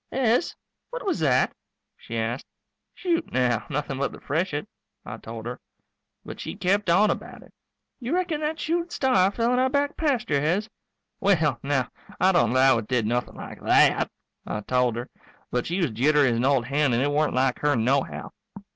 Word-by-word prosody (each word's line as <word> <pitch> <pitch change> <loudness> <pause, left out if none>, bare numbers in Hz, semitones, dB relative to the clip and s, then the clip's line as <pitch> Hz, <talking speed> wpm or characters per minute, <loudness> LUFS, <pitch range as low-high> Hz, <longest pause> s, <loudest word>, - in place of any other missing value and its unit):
"Hez, 250 +4 +1 0.3
what - - -6
was 380 - 0
that?" 130 -5 +2 0.4
she 115 - -7
asked. 115 +3 -2 0.5
"Shoot, 340 -3 -1
now, 120 -3 +1
nothing 140 -2 -3
but 140 - 0
the - - -11
freshet," 150 0 -2 0.4
I - - -6
told 115 0 -8
her. 120 +1 -5 0.7
But - - -8
she - - -5
kept 195 +1 +1
on 205 +5 +5
about - - -7
it. - - -20 0.5
"You 260 +6 -2
reckon 350 -4 -1
that 310 +1 -2
shooting 340 +2 -1
star 225 - +3
fell 230 +4 0
in 250 - +2
our 260 +1 +3
back 285 +1 0
pasture, 245 - +1
Hez?" 180 +8 0 0.5
"Well, 155 -10 +2
now, 135 -2 0 0.3
I 185 +2 +5
don't 120 - +3
'low 130 -1 +5
it 110 - -7
did 125 -4 +1
nothing 120 +2 -1
like - - -9
that," - - +4 0.4
I 105 - -3
told 125 +1 +1
her. 120 +2 -5 0.4
But 125 0 -1
she 175 - -1
was 170 -9 0
jittery 140 +4 +3
as 115 - 0
an 120 - +1
old 135 -3 +2
hen 140 0 +1
and 120 +3 +2
it 145 - +1
weren't 150 -1 +1
like 130 0 +1
her 145 -1 +2
nohow. 130 +4 0
145 Hz, 190 wpm, -25 LUFS, -, 0.7 s, on